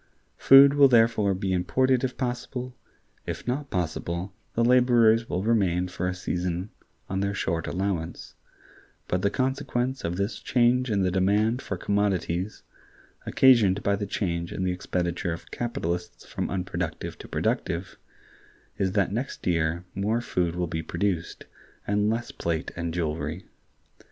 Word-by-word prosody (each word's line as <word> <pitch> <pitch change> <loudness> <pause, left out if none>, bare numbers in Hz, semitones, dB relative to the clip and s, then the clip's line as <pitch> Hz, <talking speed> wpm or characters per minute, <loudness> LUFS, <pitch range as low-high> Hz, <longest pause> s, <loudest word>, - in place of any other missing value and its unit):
Food 135 +1 +8
will 145 -1 +7
therefore 115 -5 +3
be 95 0 -1
imported 130 +8 +2
if 130 -1 -2
possible; 125 0 -4 0.5
if - - -5
not 140 +3 -2
possible, 90 +1 -3 0.2
the 115 - +2
laborers 120 -2 +4
will 90 +2 -1
remain 95 -5 +1
for 90 0 -3
a 90 - -2
season 90 +1 -3 0.4
on 95 - -2
their 100 +1 -1
short 85 -4 -2
allowance: 90 -2 -3 0.7
but 90 - 0
the 100 - +2
consequence 130 +1 -1
of 85 +1 -2
this 100 +4 -2
change 125 +1 +2
in 100 -3 +1
the 90 - +1
demand 105 +6 +2
for 100 - -4
commodities, 100 -1 -1 0.6
occasioned 110 -6 +5
by 100 - +2
the 100 0 -4
change 85 -4 -2
in 95 - -3
the 90 - +1
expenditure 90 -2 -2
of 85 - -10
capitalists 90 -7 -4
from - - -4
unproductive 90 -3 -3
to - - -10
productive, - - -2 0.8
is 95 -1 0
that 100 -3 +1
next 120 +6 -4
year 85 0 0
more 105 +4 0
food 90 -7 -1
will 90 0 -1
be 80 -1 -3
produced, 85 +1 -2 0.4
and 105 +1 +1
less 115 +2 -2
plate 85 -1 -3
and 85 -1 -3
jewelry. 80 +1 -3
100 Hz, 145 wpm, -26 LUFS, 90-115 Hz, 0.8 s, Food